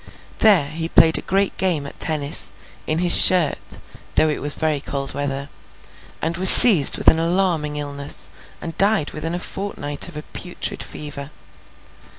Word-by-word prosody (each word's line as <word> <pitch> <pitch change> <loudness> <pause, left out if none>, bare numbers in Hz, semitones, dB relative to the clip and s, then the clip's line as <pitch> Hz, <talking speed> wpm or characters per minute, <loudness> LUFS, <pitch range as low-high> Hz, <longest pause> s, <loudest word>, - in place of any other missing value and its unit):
There 200 -9 +2
he 165 +1 -7
played 160 -1 +1
a - - -10
great 195 +1 -4
game 170 -7 -3
at 140 - -14
tennis, 150 -2 -2 0.4
in 155 - -2
his 175 0 +7
shirt, 175 -6 +1 0.4
though 155 - 0
it 150 - -6
was 145 +1 -4
very 155 -2 -4
cold 140 -1 -7
weather, 140 -1 -6 0.8
and 165 +2 -5
was 185 +1 +5
seized 185 - +9
with - - -10
an 160 - +3
alarming 165 -3 -3
illness, 145 -1 -8 0.3
and 165 -1 -10
died 200 -6 -1
within 165 +3 -8
a - - -5
fortnight 180 -6 -4
of - - -13
a 150 - -10
putrid 180 +2 -6
fever. 145 -2 -10
155 Hz, 160 wpm, -17 LUFS, 145-180 Hz, 0.8 s, seized